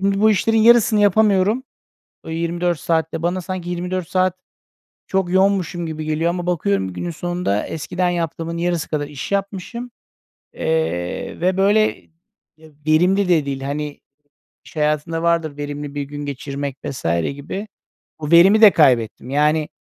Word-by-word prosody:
Şimdi 195 +1 +1
bu 220 0 +5
işlerin 225 +2 +2
yarısını 230 -1 +5
yapamıyorum. 205 +3 +3 0.6
O - - -9
24 170 0 -1
saat 160 -1 0
de 165 - -3
bana 180 +2 -1
sanki 180 -1 -5
24 180 0 -3
saat 185 -1 +1 0.7
çok 190 -2 -1
yoğunmuşum 190 -3 +1
gibi 155 -1 -5
geliyor 155 +2 0
ama 175 0 -4
bakıyorum, 100 - 0
günün 175 - -4
sonunda 175 - -2
eskiden 180 +3 -2
yaptığımın 165 -1 -3
yarısı 175 -1 -1
kadar 145 -2 -2
iş 145 +6 -7
yapmışım, 200 +5 -3 0.6
eee, 80 +2 -2
ve 185 +1 +1
böyle, 210 +2 +2 0.6
eee, 160 -1 -17 0.2
verimli 180 +5 +3
de 160 -5 +3
değil. 135 -1 -4
Hani, 145 +1 -4 0.7
iş - - -16
hayatında 150 +2 0
vardır, 165 -3 0
verimli 145 0 -6
bir 145 - -2
gün 145 +1 -7
geçirmek 140 0 -5
vs. 130 - -6 0.3
gibi. 195 +9 -6 0.5
Bu 150 0 -4
verimi 190 +6 +7
de 215 -2 +10
kaybettim. 125 -5 +2
Yani, 150 +2 +2
170 Hz, 150 wpm, -20 LUFS, 150-185 Hz, 0.7 s, de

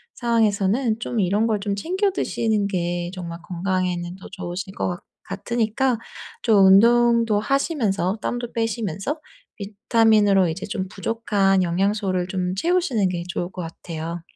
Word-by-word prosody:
상황에서는 225 0 +1
좀 230 0 -3
이런 205 +3 +2
걸 215 -3 +1
좀 200 0 -2
챙겨 375 - 0
드시는 220 - 0
게 175 -2 -2
정말 170 -2 -7
건강에는 180 -1 -2
더 190 - -11
좋으실 185 +2 -6
거 - - -1
같 175 -1 -4 0.2
같으니까 235 +5 -1 0.4
좀 205 -5 +5
운동도 230 +2 +5
하시면서 220 - 0
땀도 240 -1 -3
빼시면서 225 - -2 0.4
비타민으로 205 -1 +3
이제 180 +5 -4
좀 195 -3 -3
부족한 195 -2 +1
영양소를 185 +1 0
좀 185 -1 -2
채우시는 275 - +1
게 175 -1 -3
좋을 175 0 -3
것 185 - -6
같아요. 165 0 -6
200 Hz, 305 characters per minute, -23 LUFS, 185-230 Hz, 0.4 s, 좀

